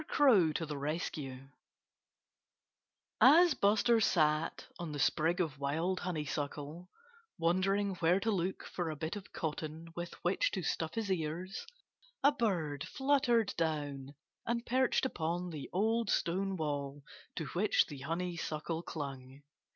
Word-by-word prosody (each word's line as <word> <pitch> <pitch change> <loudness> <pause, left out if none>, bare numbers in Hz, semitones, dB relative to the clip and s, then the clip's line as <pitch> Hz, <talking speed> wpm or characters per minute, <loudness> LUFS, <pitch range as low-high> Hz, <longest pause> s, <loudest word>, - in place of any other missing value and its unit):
CROW 215 - +5
TO 165 - -2
THE 150 -2 -5
RESCUE 140 -3 -4 1.7
As 330 +5 +8
Buster 220 +2 +3
sat 155 -6 +2
on 170 -3 -4
the - - -4
sprig 160 +5 +2
of 155 -6 -1
wild 160 +7 0
honeysuckle, 150 0 -4 0.5
wondering 195 +4 +2
where 175 +3 +3
to 225 +3 0
look 190 -1 -1
for 175 -3 -3
a 155 - -3
bit 155 +4 -4
of 200 -2 -9
cotton 160 +1 -5
with 175 0 -5
which 180 +2 +2
to 190 - -2
stuff 160 -1 -2
his 220 -3 -1
ears, 180 - -3 0.6
a 285 - +7
bird 175 - -1
fluttered 260 -6 +2
down 145 -4 -2 0.3
and 235 0 -1
perched 260 +1 +2
upon 175 -5 -2
the 150 -4 -6
old 220 +3 +1
stone 190 +3 0
wall 145 -2 -3 0.3
to 165 - -3
which 200 +4 +3
the 145 -3 -9
honeysuckle 165 +1 -3
clung. 135 -4 -7
170 Hz, 135 wpm, -33 LUFS, 150-195 Hz, 1.7 s, As